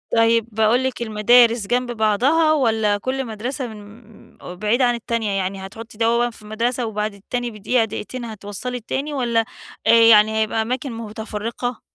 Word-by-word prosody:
طيب، 230 0 +3
باقول 220 +4 +2
لِك 260 -2 -3
المدارس 230 0 +4
جنب 245 0 0
بعضها، 245 +9 +2
والّا 220 -7 +1
كل 260 +5 -3
مدرسة 245 +4 -4
من 215 +1 -14
م 180 - -9
بعيدة 215 +7 +1
عن 240 0 +2
التانية، 230 -2 -2
يعني 190 0 -3
هتحطّي 220 +2 -11
دوّة 235 +1 +2
في 220 -2 -16
مدرسة 235 +3 -1
وبعد 215 -1 -3
التاني 240 +4 -4
بدقيقة 225 +3 0
دقيقتين 230 +3 -6
هتوَصّلي 220 +3 -6
التاني، 275 +6 -4
والّا 235 -4 +1 0.4
آآ - - +7
يعني 220 -1 +6
هيبقى 220 +1 0
أماكن 255 +4 -3
متفرّقة؟ 225 +2 -5
230 Hz, 155 wpm, -21 LUFS, 215-245 Hz, 0.4 s, آآ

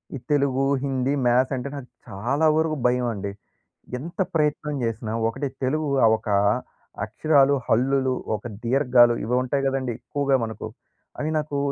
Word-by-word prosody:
ఈ - - -3
తెలుగు, 140 -2 +2 0.2
హిందీ, 135 0 0
మ్యాథ్స్ 130 +3 +3
అంటే, 130 +2 -4
నాకు 130 -4 -8 0.2
చాలా 120 +10 -1
వరకు 160 -1 +1
భయమండి. 120 -5 0 0.7
ఎంత 170 +7 -9 0.2
ప్రయత్నం 150 -1 0
జేసినా 115 -1 -3 0.2
ఒకటి 140 +5 -3 0.2
తెలుగు 150 +3 0 0.2
ఆహ్, 110 - +5
ఒక - - -8 0.8
అక్షరాలు, 140 -2 +3
హల్లులు, 130 +2 +2 0.2
ఒక 105 - -8 0.2
దీర్ఘాలు 125 -2 +4
ఇవి 120 +3 0
ఉంటాయి 135 +2 -1
గదండీ, 130 -3 -1
ఎక్కువగా 140 +1 0
మనకు. 110 -1 -5 0.5
అవి 150 - -1
నాకు 150 -1 -2
130 Hz, 140 wpm, -24 LUFS, 120-145 Hz, 0.8 s, ఆహ్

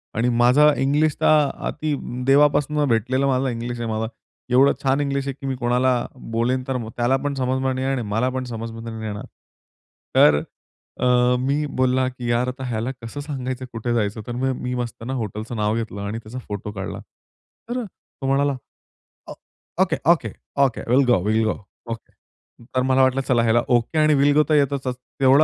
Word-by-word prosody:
आणि 120 +3 +1
माझा 145 +5 +6
इंग्लिश 145 +3 +2
तर - - +2
अ, 150 -3 +3
अति 155 -2 -2 0.3
देवापासून 145 +1 +3
भेटलेला 130 +5 +1
माझा 130 0 +1
इंग्लिश 120 0 -4
आहे 115 -1 -3
माझा. 110 0 -1 0.4
एवढं 130 +3 +5
छान 135 +2 +2
इंग्लिश 140 -1 -1
आहे 135 - -2
की 135 - -4
मी 130 - -1
कोणाला 125 +1 +2 0.4
बोलेन 125 +3 +1
तर 130 -1 -1 0.2
त्याला 120 +2 +2
पण 145 -1 -1
समजणार 130 0 0
नाही 130 +1 -2
आणि 135 -2 0
मला 120 +4 +1
पण 130 - -1
समजमध्ये 115 0 -6
नाही 110 0 -6
येणार. 105 -1 -5 0.9
तर 75 -1 +7 0.6
अ, 125 0 +3
मी 140 +3 0
बोलला 130 0 +3
की 125 -2 -6
यार 120 +2 +1
आता 130 +1 -5
ह्याला 115 +2 -2
कसं 115 +5 -7
सांगायचं 130 -3 -4
कुठे 120 +1 -2
जायचं 110 -1 -1
तर - - -4
मग 130 +1 0
मी 125 0 -3
मस्तना 120 +1 -4
हॉटेलचं 110 0 -4
नाव 105 0 0
घेतलं 110 -3 -4
आणि 105 +2 -3
त्याचा 115 +3 -8
फोटो 105 0 -5
काढला. 100 -2 -5 0.7
तर 245 0 -2
तो 160 -6 -12
म्हणाला, 140 0 +2 1.3
"okay, 190 - +2
okay, 170 - +1 0.3
okay 125 - -2
will 135 +2 +5
go, 120 -6 +4
will 110 +2 +2
go 110 - +1 0.4
okay." 115 - -7 0.6
तर 130 - +3
मला 130 +1 +3
वाटलं, 130 +1 +2
चला 120 -2 +3
ह्याला 115 +1 +3
ओके 120 +4 +1
आणि 155 0 +4
विल 145 +1 +4
गो 150 - +6
तर 155 - +4
येतच 140 -2 +1
तेवढं 130 +3 +2
130 Hz, 180 wpm, -22 LUFS, 115-135 Hz, 1.3 s, तर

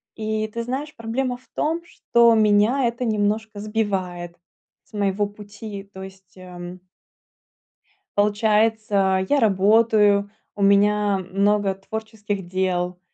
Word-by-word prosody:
И 215 0 -2
ты 235 +2 -5
знаешь, 275 +5 -5
проблема 245 +3 -2
в 255 - -26
том, 325 +3 -1
что 235 -7 +3
меня 215 +5 +3
это 235 +2 -3
немножко 215 -1 -1
сбивает 190 -5 -3 0.5
с - - -32
моего 205 0 0
пути. 205 0 -9
То 190 - -8
есть, 190 0 -14
эм 180 0 -9 1.4
Получается, 210 -2 +2
я 290 - +3
работаю, 210 -1 +3 0.3
у 205 - -6
меня 205 0 +3
много 200 0 +2
творческих 205 -1 -6
дел, 180 -1 -1
210 Hz, 115 wpm, -22 LUFS, 195-220 Hz, 1.4 s, что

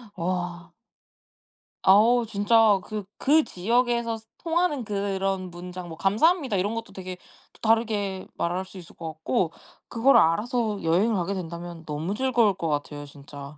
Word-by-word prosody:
와. 175 -1 -3 1.1
아오 230 +5 +5
진짜 210 0 +4
그 215 -2 -5
그 305 +3 +4
지역에서 235 +3 0 0.2
통하는 330 -5 0
그런 195 -2 -2
문장 180 +1 -8
뭐 160 - -8
"감사합니다." 255 - +2
이런 205 +5 -1
것도 225 -3 -6
되게 185 -1 -7 0.4
또 - - -22
다르게 215 -4 0
말할 180 +2 -2
수 190 - -13
있을 175 -2 -12
것 160 -2 -6
같고 160 +2 -1 0.4
그거를 250 +4 +4
알아서 215 +5 +1
여행을 185 +8 +2
가게 190 +1 -1
된다면 170 -2 -7
너무 155 +6 -3
즐거울 240 -4 +2
것 165 -2 -4
같아요 145 0 -3
진짜. 140 0 -11
195 Hz, 295 characters per minute, -25 LUFS, 175-230 Hz, 1.1 s, 아오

